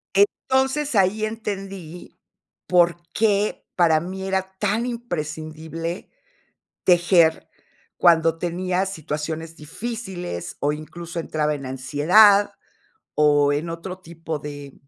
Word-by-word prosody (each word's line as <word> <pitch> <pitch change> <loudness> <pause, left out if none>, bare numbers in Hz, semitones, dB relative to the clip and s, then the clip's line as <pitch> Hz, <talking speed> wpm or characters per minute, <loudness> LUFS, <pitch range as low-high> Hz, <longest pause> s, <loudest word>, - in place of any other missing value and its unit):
Entonces 265 +7 +2
ahí 205 +2 +3
entendí 195 -6 -6 0.5
por 175 -1 +4 0.2
qué 210 -1 +1
para 165 -3 +4
mí 185 +4 -6
era 190 0 -2
tan 210 +3 0
imprescindible 165 -6 -5 0.8
tejer 175 -2 +4 0.5
cuando 165 -2 +4
tenía 180 +2 -1
situaciones 160 -2 -5
difíciles, 180 - -6
o, 145 - +2
incluso, 165 +3 -7
entraba 150 -2 -1
en 140 -2 -7
ansiedad, 165 +11 +4 0.6
o, 145 -1 +4
en 155 +4 -2
otro 175 +3 -6
tipo 165 -2 -6
de 145 -1 -8
170 Hz, 100 wpm, -23 LUFS, 155-195 Hz, 0.8 s, por